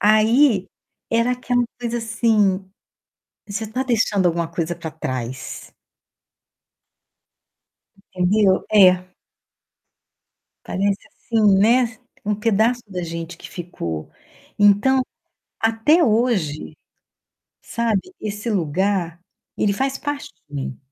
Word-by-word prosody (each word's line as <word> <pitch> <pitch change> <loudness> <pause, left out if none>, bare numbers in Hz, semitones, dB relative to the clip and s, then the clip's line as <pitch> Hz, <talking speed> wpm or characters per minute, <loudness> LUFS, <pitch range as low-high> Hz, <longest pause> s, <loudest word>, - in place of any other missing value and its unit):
Aí 215 0 +4 0.4
era 230 +2 +2
aquela 245 0 0 0.2
coisa 240 0 -2
assim, 215 -4 +1 0.8
você 220 +2 -3
tá 250 +5 -2
deixando 220 -6 +1
alguma 170 -1 0
coisa 170 0 -3
pra 165 -2 -7
trás. 130 -4 -6 2.4
Entendeu? 190 +1 +2
É. 185 -3 +6 1.6
Parece 200 +1 0
assim, 215 -8 +2
né, 230 +2 +3 0.3
um 210 - +1
pedaço 225 +3 +1
da 180 -3 -4
gente 165 0 -6
que - - -11
ficou. 85 - -6 0.5
Então, 205 +6 +4 0.6
até 225 +10 +3
hoje, 215 - 0 0.9
sabe, 230 -4 0 0.2
esse 210 +2 -4
lugar, 180 -1 0 0.4
ele 200 - +2
faz 270 +5 -1
parte 290 -1 -4 0.2
de 145 - -13
mim. 135 -2 -4
205 Hz, 100 wpm, -21 LUFS, 180-230 Hz, 2.4 s, É